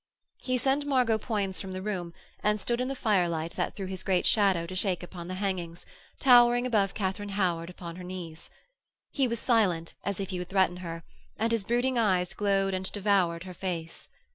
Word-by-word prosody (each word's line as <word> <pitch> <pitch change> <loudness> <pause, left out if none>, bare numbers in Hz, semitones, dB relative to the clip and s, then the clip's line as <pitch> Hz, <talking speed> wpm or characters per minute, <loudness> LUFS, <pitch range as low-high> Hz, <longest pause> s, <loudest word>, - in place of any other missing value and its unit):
He 255 -1 0
sent 275 +3 +1
Margot 250 -5 +3
Poins 200 -6 -2
from 190 -1 -6
the 185 - -4
room, 185 -5 -3 0.3
and 210 0 +2
stood 240 +4 -1
in 255 - -1
the 275 - -3
firelight 175 -8 +1
that - - -2
threw 195 - -4
his 185 -1 -5
great 185 -2 +1
shadow 195 -6 +3
to 175 - -7
shake 185 -1 0
upon 175 -1 -8
the 185 - -4
hangings, 185 -4 -3 0.3
towering 245 -1 +6
above 210 -6 +1
Katharine 205 0 -2
Howard 170 -3 0
upon 175 -1 -8
her 180 - -8
knees. 175 -3 -7 0.6
He 270 -3 +2
was 235 -1 -2
silent, 190 -10 +2
as 200 -1 -2
if 195 -1 -3
he 180 - -3
would 180 - -5
threaten 190 -2 +2
her, 165 -2 -6 0.3
and 225 +2 0
his 230 -3 +1
brooding 245 +3 +1
eyes 185 -5 +2
glowed 195 -1 +1
and 185 0 -2
devoured 190 -5 +1
her 185 -1 -8
face. 170 -2 -5
190 Hz, 195 wpm, -29 LUFS, 180-220 Hz, 0.6 s, towering